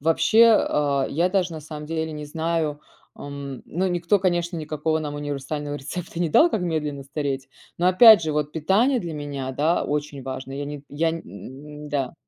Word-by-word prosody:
вообще, 165 +9 +4
а, 140 -2 +1
я 170 +5 +1
даже 185 -2 0
на 160 - -6
самом 150 0 -8
деле 160 0 -3
не 150 0 -6
знаю. 160 -1 -2 0.4
А, - - -9
м, 140 -2 -7
но 185 +4 -2
никто 175 +3 +1
конечно 175 -2 0
никакого 155 0 -1
нам 150 -2 -4
универсального 145 0 -4
рецепта 165 +4 -6
не 170 - +1
дал, 325 - +5
как 215 - -1
медленно 150 -5 -2
стареть. 135 -1 -4 0.3
Но, 175 - +2
опять 205 +1 +8
же, 155 -1 -1
вот 150 0 -1
питание 210 - +2
для 170 -4 -5
меня, 140 -3 -5
да, 155 +6 +1
очень 145 -2 -3
важно 130 0 -6
я 140 +1 -4
не 145 0 -7
я 160 +3 0
нь 150 - -9
да. 140 -3 -2
150 Hz, 185 wpm, -24 LUFS, 145-170 Hz, 0.4 s, опять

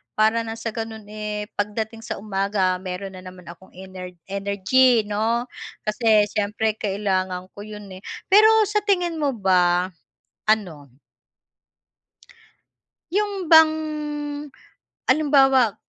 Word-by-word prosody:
para 220 +2 +2
ng 225 - -4
sa 225 0 -5
gano'n, 225 -1 -6
eh, 210 0 -4 0.2
pagdating 220 +2 -2
sa 235 - -4
umaga, 195 -2 0
meron 185 +1 -6
na 185 - -10
naman 185 0 -12
akong 190 +2 -17
ener 185 -1 -9 0.2
energy 200 +5 +3
'no, 220 +3 0 0.4
kasi 215 -1 +3
siyempre 210 +2 0
kailangan 190 -2 -2
ko - - -13
yun, 210 -1 -9
eh. 185 - -9 0.3
Pero 425 +3 +8 0.2
sa 420 +1 +1
tingin 355 -5 +1
mo 280 -4 0
ba, 180 -2 +2 0.6
ano 180 -10 0 2.2
Yung 400 -3 -1
bang 320 0 +9 1.4
halimbawa 270 -7 +4
210 Hz, 115 wpm, -23 LUFS, 190-235 Hz, 2.2 s, bang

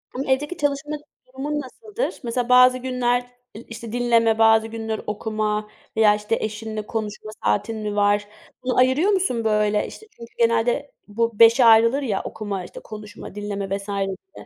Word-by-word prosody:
Imm, 270 +2 -3
evdeki 295 +6 0
çalışma 290 +1 -1 0.3
durumun 285 +3 -3
nasıldır? 425 - -5
Mesela, 240 +1 -2
bazı 250 0 +7
günler, 250 -1 0 0.4
ııı, 235 - -11
işte, 230 -1 -8
dinleme, 230 -2 +2
bazı 225 0 +5
günler 225 -1 -4
okuma 210 0 -2 0.3
veya, 210 -1 +5
işte, 210 +2 -1
eşinle 215 0 -4
konuşma 215 -1 -5
saatin 220 - 0
mi 210 -1 -4
var? 205 0 +2 0.4
Bunu 255 - -1
ayırıyor 260 +10 +4
musun, 355 - 0
böyle? 210 -1 +1
İşte, 435 - -12
çünkü 235 0 -12
genelde 235 +4 +1 0.2
bu 230 +1 -2
5'e 230 +2 +7
ayrılır 230 +4 +6
ya, 220 -8 -1
okuma, 200 -4 -5
işte - - -10
konuşma, 210 -2 -10
dinleme 200 -1 -3
vs. 195 - -10
gibi. 200 - -5
225 Hz, 160 wpm, -22 LUFS, 210-255 Hz, 0.4 s, bazı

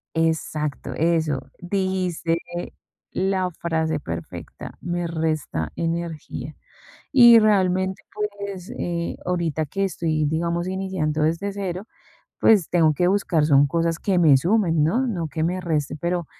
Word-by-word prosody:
Exacto, 155 -4 -1
eso, 160 -1 +1 0.2
dijiste 180 -3 -1 0.7
la 190 -1 0
frase 160 -2 -1
perfecta: - - -7
"Me 175 0 -2
resta 155 - -2
energía". 165 -2 -4 0.6
Y 240 -4 +9
realmente, 190 -3 +2 0.4
pues, 195 -3 -6
eh, 170 -1 -3
ahorita 170 -3 -1
que 195 +7 -2
estoy, 160 -5 0
digamos, 170 +3 -1
iniciando 185 -5 -2
desde 170 +6 0
0, 195 0 -4 0.5
pues, 205 -7 +4
tengo 165 -3 +4
que 175 +4 +1
buscar 180 -6 +2
son 145 -1 +5
cosas 165 +2 0
que 190 -1 +1
me 155 -6 +6
sumen, 170 -1 +2
¿no?, 240 +12 +1
no 175 -9 -2
que 155 +2 -3
me 180 +3 0
resten, 155 -5 -1
pero 170 +1 -1
170 Hz, 130 wpm, -23 LUFS, 160-185 Hz, 0.7 s, Y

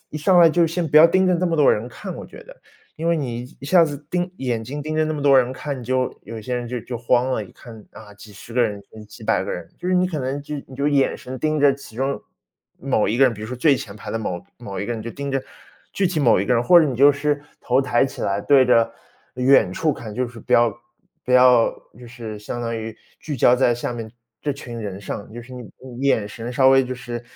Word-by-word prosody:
一 - - -6
上 180 +4 +4
来， 170 -1 +8
就 170 +2 +3
先 165 +1 -2
不 150 - +2
要 155 +2 +10
盯 185 +2 +3
着 180 - +3
这 180 +2 0
么 165 -1 0
多 150 -3 +5
人 110 +3 -3
看， 185 +8 -8
我 - - -8
觉 - - -13
得。 - - -14 0.4
因 165 - -4
为 170 - +3
你 120 -5 -3 0.2
一 140 - -8
下 170 +2 +5
子 145 -2 -7
盯 180 0 -1
眼 120 -4 -2
睛 140 +6 -6
盯 155 +1 -4
着 155 - +2
那 155 - -2
么 150 - -4
多 140 -1 +5
人 125 0 +1
看， 140 +1 -5
你 125 - -9
就 130 +1 -1
有 115 -1 -8
些 125 +4 -4
人 120 -1 -4
就 125 +1 -4
就 120 +2 -6
慌 125 +2 +1
了， 110 -5 -1
一 95 - -16
看， 110 -4 -13
啊， 105 -2 -13
几 105 +1 -14
十 115 +3 -12
个 125 - +3
人， 105 -3 -2 0.2
几 110 +2 -14
百 - - +1
个 - - -4
人。 - - -7
就 - - -7
是 - - +1
你 180 0 +3
可 170 -4 -4
能 135 +1 -3
就 150 +1 -6
你 130 - -13
就 140 +2 0
眼 140 -2 +2
神 130 +1 -8
盯 155 +3 0
着 140 -1 +5
其 140 -5 -13
中 135 +2 -1 0.6
某 130 -5 0
一 115 - -1
个 135 - +6
人， 125 - +2
比 105 - -9
如 - - -5
说 125 - -5
最 140 +3 +3
前 100 - -8
排 - - -8
的 115 - -2
某 90 -5 -4 0.2
某 100 -5 -6
一 100 - -4
个 120 - -2
人， 110 - -6
就 115 - -6
盯 140 +3 -5
着 135 -1 -1 0.5
具 195 - +1
体 175 -3 -1
某 115 -8 +4
一 100 - -2
个 125 - +2
人， 120 - +2
或 175 +6 +7
者 160 - +3
你 130 -4 -3
就 140 +3 +6
是 145 +1 -1 0.2
头 130 +2 +1
抬 125 -2 +2
起 - - -8
来， 100 +1 0
对 135 +4 +5
着 115 -2 +3 0.4
远 125 -6 +4
处 155 - 0
看， 110 -5 -8
就 125 +3 -1
是 120 -1 -11
不 - - 0
要 120 -1 +4 0.5
不 125 - -2
要 125 -2 +6 0.3
就 125 - -11
是 115 -3 -8
相 120 +3 -6
当 115 0 -3
于 110 0 -6 0.2
聚 150 -3 -5
焦 120 0 +5
在 125 -2 +2
下 120 - -4
面 115 -2 -7 0.3
这 145 - -1
群 120 -4 -8
人 100 -3 -5
上， 100 0 -7
就 120 - -7
是 125 +2 -14
你 125 -3 -9 0.3
你 135 - -1
眼 110 -6 +2
神 115 +3 -7
稍 130 +1 +4
微 135 0 +6
就 130 0 -5
是 120 -1 -7
125 Hz, 300 characters per minute, -22 LUFS, 115-145 Hz, 0.6 s, 要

